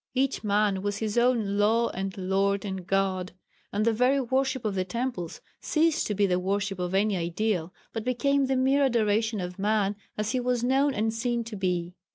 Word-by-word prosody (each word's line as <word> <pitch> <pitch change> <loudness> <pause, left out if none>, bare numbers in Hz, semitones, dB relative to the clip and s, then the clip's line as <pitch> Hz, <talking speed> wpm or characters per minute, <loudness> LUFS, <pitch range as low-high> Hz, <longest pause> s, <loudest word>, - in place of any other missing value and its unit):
Each 270 -1 0
man 205 -2 +1
was 205 0 -2
his 215 -1 -2
own 235 -5 +2
"Law, 225 +3 +3
and 190 +1 -4
Lord 195 +2 0
and 190 -2 -5
God," 190 -2 0 0.4
and 210 +2 0
the 230 - +3
very 250 +5 +3
worship 260 0 0
of 210 - 0
the 185 -1 0
temples 190 -3 -4 0.2
ceased 320 0 +1
to 210 - -2
be 205 +1 +3
the 180 -2 +1
worship 195 +1 -1
of 180 +1 -2
any 205 +1 +2
ideal, 175 0 -1 0.2
but 225 - -3
became 275 +3 +1
the 265 - +1
mere 265 +2 +3
adoration 220 -3 +1
of 180 +1 -5
man 205 0 +1 0.2
as 215 +1 -1
he 255 - 0
was 245 -1 0
known 270 +2 +2
and 220 +1 0
seen 235 +1 -1
to 225 -1 -7
be. 180 -2 -1
210 Hz, 200 wpm, -27 LUFS, 195-245 Hz, 0.4 s, Law